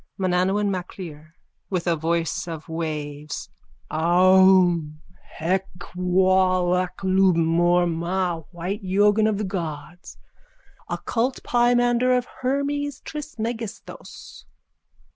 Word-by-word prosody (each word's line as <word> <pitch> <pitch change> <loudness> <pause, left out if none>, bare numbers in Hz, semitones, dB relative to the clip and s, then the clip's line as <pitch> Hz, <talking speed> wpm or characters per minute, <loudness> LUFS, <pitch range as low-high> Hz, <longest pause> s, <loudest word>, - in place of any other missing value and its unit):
_ - - -34
MANANAUN 190 +2 +1
MACLIR: 170 -4 -7 0.3
(With 180 -3 -2
a 170 -2 +2
voice 165 +2 -1
of 160 -2 -7
waves.) 150 -2 -5 0.4
Aum! 175 -1 +4 0.2
Hek! 185 +4 -2 0.3
Wal! 185 0 +2
Ak! 180 0 -2
Lub! 190 -1 +3
Mor! 175 +2 +3
Ma! 175 +1 -1
White 185 +5 -5
yoghin 205 +3 +3
of 215 -2 0
the 210 - -2
gods. 175 -3 -6 0.7
Occult 245 +3 -2
pimander 245 +1 +3
of 250 - -2 0.2
Hermes 280 +1 -1
Trismegistos. 235 -7 -7
185 Hz, 100 wpm, -23 LUFS, 170-205 Hz, 0.7 s, Aum